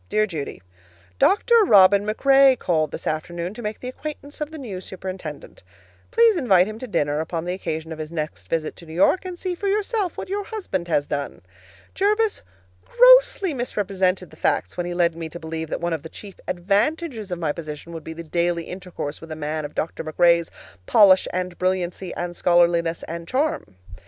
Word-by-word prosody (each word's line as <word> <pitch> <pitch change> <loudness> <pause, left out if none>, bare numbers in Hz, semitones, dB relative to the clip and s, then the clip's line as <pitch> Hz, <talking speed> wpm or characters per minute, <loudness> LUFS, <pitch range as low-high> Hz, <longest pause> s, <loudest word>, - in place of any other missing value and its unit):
Dear 215 - +2
Judy: 155 - -6 0.6
Dr. 440 +4 +3
Robin 200 - +6
MacRae 270 +4 +5
called 155 -6 0
this - - -8
afternoon 170 +3 -3
to 240 - -9
make 210 -1 -4
the 250 - -6
acquaintance 290 +2 -7
of 300 - -2
the 320 - -9
new 210 -10 -6
superintendent. 190 - -8 0.5
Please 465 -3 +5
invite 195 - +4
him 215 +2 -7
to 255 - -6
dinner 150 -7 0
upon 165 +1 -3
the 180 - -2
occasion 160 -3 -4
of 160 - -6
his 155 0 -6
next 150 - -5
visit 160 -2 -2
to 170 - -13
New 160 - -9
York, 280 - +3
and 365 -1 -6
see 365 0 -3
for 400 +3 -4
yourself 410 -2 0
what - - -5
your 400 +1 -3
husband 280 - -4
has 145 -4 +1
done. 145 -1 -4 0.5
Jervis 420 +2 +1 0.4
grossly - - +5
misrepresented 195 -7 -1
the - - -15
facts - - 0
when 175 0 -3
he 175 - -4
led 170 -2 +2
me 165 -1 -6
to 170 - -9
believe 160 -1 -5
that - - -3
one 170 0 -1
of 160 - -3
the 160 - -9
chief 200 +2 -10
advantages 215 - 0
of 180 - -3
my 160 -3 -1
position 155 +1 -7
would 165 -2 -7
be 160 - -7
the 170 +1 -8
daily 170 +1 0
intercourse 180 -5 -7
with 165 0 -10
a - - -4
man 155 0 -3
of 145 - -9
Dr. 165 - -3
MacRae's 170 +1 +3 0.4
polish 195 -3 +6
and 180 -1 -3
brilliancy 185 0 -1
and 175 0 -4
scholarliness 170 -1 +2
and 170 0 -6
charm. 260 - -1
180 Hz, 195 wpm, -23 LUFS, 165-255 Hz, 0.6 s, Robin